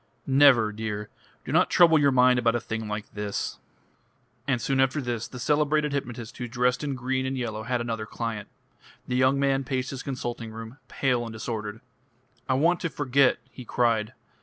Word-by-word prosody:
"Never, 135 Hz, -5 st, +5 dB
dear. 105 Hz, -1 st, -4 dB, 0.4 s
Do -, -, -5 dB
not -, -, +4 dB
trouble 165 Hz, -3 st, +6 dB
your 145 Hz, -1 st, +4 dB
mind 125 Hz, -1 st, +5 dB
about 115 Hz, -1 st, +2 dB
a -, -, +1 dB
thing 110 Hz, -1 st, -4 dB
like 105 Hz, 0 st, -5 dB
this." 105 Hz, -1 st, -3 dB, 0.9 s
And 130 Hz, -3 st, +1 dB
soon 135 Hz, +3 st, 0 dB
after 135 Hz, +3 st, +2 dB
this 120 Hz, -4 st, -3 dB
the 125 Hz, -, -10 dB
celebrated 150 Hz, +2 st, +1 dB
hypnotist 120 Hz, -4 st, -5 dB
who 120 Hz, -, -3 dB
dressed 125 Hz, +3 st, 0 dB
in 140 Hz, -2 st, -2 dB
green 130 Hz, +1 st, -1 dB
and 135 Hz, 0 st, -2 dB
yellow 110 Hz, -4 st, -3 dB
had 120 Hz, +2 st, -1 dB
another 115 Hz, -2 st, -3 dB
client. 115 Hz, -3 st, -4 dB, 0.6 s
The 125 Hz, -, -1 dB
young 130 Hz, +2 st, +3 dB
man 135 Hz, -1 st, +2 dB
paced 130 Hz, 0 st, -2 dB
his 135 Hz, -1 st, -5 dB
consulting 120 Hz, -4 st, -4 dB
room, 115 Hz, +4 st, -9 dB
pale 125 Hz, -3 st, 0 dB
and 115 Hz, -, -6 dB
disordered. 110 Hz, -1 st, -5 dB, 0.7 s
"I 130 Hz, -, +3 dB
want 170 Hz, +6 st, +3 dB
to 165 Hz, -, -2 dB
forget," 140 Hz, -2 st, +3 dB
he 130 Hz, -, -10 dB
cried. 115 Hz, -2 st, +1 dB
125 Hz, 185 wpm, -26 LUFS, 115-135 Hz, 0.9 s, trouble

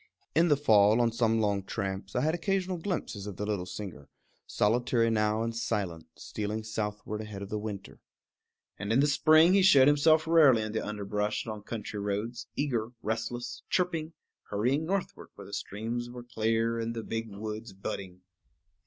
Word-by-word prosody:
In 165 Hz, +2 st, +4 dB
the 145 Hz, -3 st, +4 dB
fall, 110 Hz, -5 st, +5 dB
on 120 Hz, -1 st, +3 dB
some 115 Hz, -1 st, +2 dB
long 100 Hz, -2 st, +1 dB
tramps, 95 Hz, -1 st, -4 dB
I 125 Hz, -, +2 dB
had 155 Hz, +3 st, +1 dB
occasional 185 Hz, +1 st, -1 dB
glimpses 160 Hz, -, -4 dB
of 100 Hz, -, -7 dB
the 105 Hz, -, -3 dB
little 100 Hz, -4 st, -2 dB
singer, 90 Hz, -7 st, -8 dB, 0.4 s
solitary 115 Hz, +1 st, +2 dB
now 105 Hz, 0 st, +1 dB
and 115 Hz, 0 st, -3 dB
silent, 105 Hz, -8 st, -2 dB
stealing 105 Hz, +1 st, -4 dB
southward 105 Hz, -1 st, -4 dB
ahead 105 Hz, -2 st, -7 dB
of 100 Hz, -, -8 dB
the 105 Hz, -, -2 dB
winter. 105 Hz, -2 st, -7 dB, 0.8 s
And 105 Hz, -, -3 dB
in 115 Hz, -, +4 dB
the 140 Hz, -, +5 dB
spring 155 Hz, +4 st, +5 dB
he 195 Hz, -, +5 dB
showed 140 Hz, -8 st, +7 dB
himself 155 Hz, +2 st, +4 dB
rarely 150 Hz, -9 st, +5 dB
in 110 Hz, -, -4 dB
the 110 Hz, -, -2 dB
underbrush 105 Hz, 0 st, -2 dB
on 110 Hz, -2 st, -5 dB
country 105 Hz, -1 st, -5 dB
roads, 105 Hz, +4 st, -3 dB
eager, 120 Hz, -6 st, -1 dB
restless, 120 Hz, +2 st, -3 dB
chirping, 170 Hz, -3 st, 0 dB, 0.4 s
hurrying 130 Hz, +10 st, 0 dB
northward 195 Hz, 0 st, -3 dB
where -, -, -10 dB
the -, -, -12 dB
streams 115 Hz, +4 st, -4 dB
were 120 Hz, 0 st, -8 dB
clear 115 Hz, 0 st, 0 dB
and 115 Hz, 0 st, -3 dB
the 115 Hz, -, -4 dB
big 115 Hz, 0 st, -4 dB
woods 110 Hz, +1 st, -6 dB
budding. 95 Hz, -1 st, -6 dB
115 Hz, 170 wpm, -29 LUFS, 105-130 Hz, 0.8 s, showed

